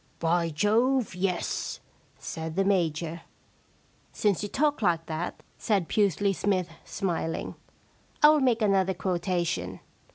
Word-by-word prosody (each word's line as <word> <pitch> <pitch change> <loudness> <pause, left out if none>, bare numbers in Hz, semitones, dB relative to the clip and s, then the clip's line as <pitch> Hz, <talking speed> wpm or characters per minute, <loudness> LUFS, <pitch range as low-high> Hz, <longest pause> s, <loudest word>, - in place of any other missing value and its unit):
* - - -35
By 170 0 +2
Jove, 225 - +2
yes,' 180 0 -2 0.4
said 160 0 -6
the 195 +1 +2
Major. 170 -3 0 0.5
* - - -36
Since 205 -4 +1
you 205 - -3
talk 295 +3 +1
like 170 -5 +1
that,' 160 +2 -4 0.2
said 200 -7 +1
Pusely 200 0 +2
Smythe, 185 -2 0
sm.iling. 170 -4 -3 0.4
* - - -23
I 300 - +10
will 305 0 +5
make 245 -5 +2
another 190 -2 +2
quotation. 175 - -1
185 Hz, 135 wpm, -27 LUFS, 170-205 Hz, 0.5 s, I